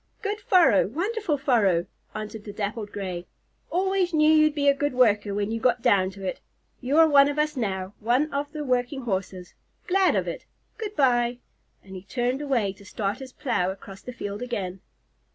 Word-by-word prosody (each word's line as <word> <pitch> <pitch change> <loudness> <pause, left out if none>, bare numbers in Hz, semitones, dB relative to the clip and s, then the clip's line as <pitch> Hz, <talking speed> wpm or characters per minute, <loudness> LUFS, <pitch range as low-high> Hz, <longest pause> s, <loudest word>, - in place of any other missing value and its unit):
"Good 415 0 -2
furrow! 360 - +4
Wonderful 355 - -1
furrow!" 210 - +2 0.3
answered 215 0 -6
the 210 - -7
Dappled 205 +1 -4
Gray. 180 -3 -5 0.4
"Always 370 -1 +1
knew 305 0 +5
you'd 310 -1 +4
be 285 -1 +1
a 280 - +7
good 290 0 -1
worker 210 -5 +3
when 205 +1 -1
you 230 - -2
got 245 0 +1
down 195 -6 +3
to 195 0 -9
it. 185 - -4 0.4
You 270 +4 0
are 325 0 +8
one 280 -2 +6
of 290 - -4
us 300 0 0
now, 195 -5 -3
one 250 +8 +1
of 285 +1 -2
the 305 -1 -5
working 255 0 -1
Horses. 190 -4 -4 0.3
Glad 380 +1 +3
of - - 0
it. - - -6 0.3
Good 425 -2 -5
bye!" 245 -3 +2 0.5
And 190 0 -11
he 185 - -7
turned 245 +6 -2
away 240 -9 0
to 200 - -17
start 205 +3 -3
his 265 -1 -9
plow 190 -10 -1
across 195 0 -9
the 250 - -7
field 205 -3 -6
again. 195 -7 -4
245 Hz, 190 wpm, -25 LUFS, 200-295 Hz, 0.5 s, are